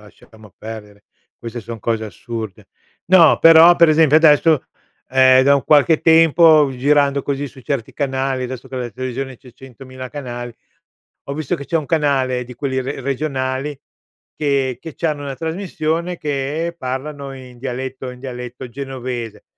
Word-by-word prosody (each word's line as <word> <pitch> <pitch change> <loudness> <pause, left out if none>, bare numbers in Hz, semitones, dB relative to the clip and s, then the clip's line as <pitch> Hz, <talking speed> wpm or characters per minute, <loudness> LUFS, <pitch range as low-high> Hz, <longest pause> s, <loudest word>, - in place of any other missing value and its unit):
lasciamo 105 0 -18
perdere. 105 -2 -10 0.3
Queste 120 0 -7
son 115 +1 -8
cose 110 0 -1
assurde. 110 0 -8 0.4
No, 175 -3 +6
però 165 +1 +8
per 170 -1 +6
esempio 155 -1 +5
adesso, 155 -1 +4 0.4
ehm, 130 0 +5
da 140 +1 +5
un 135 - -4
qualche 150 +1 +4
tempo 160 -2 +5
girando 140 +1 +2
così 140 0 -3
su 135 - -15
certi 135 -4 -3
canali, 135 -2 -2
adesso 130 +1 -8
che 130 - -7
la 125 -1 -4
televisione 130 +3 -5
c'è 125 0 -17
100.000 130 0 -11
canali, 120 -4 -7 0.7
ho 140 - -5
visto 155 -2 -2
che 140 - -8
c'è 170 - 0
un 155 -3 -2
canale 135 -5 0
di 125 +1 -11
quelli 130 +1 -2
re 135 +2 -5
regionali 135 0 -3 0.6
che 135 -4 0
che 160 0 -9
c'hanno 150 -3 -2
una 140 -2 -6
trasmissione 165 +1 -3
che 150 +3 -3
parlano 135 +1 -5
in 125 -2 -13
dialetto, 130 +1 -5
in 125 0 -12
dialetto 125 -1 -7
genovese. 125 -3 -6
135 Hz, 155 wpm, -19 LUFS, 125-150 Hz, 0.7 s, però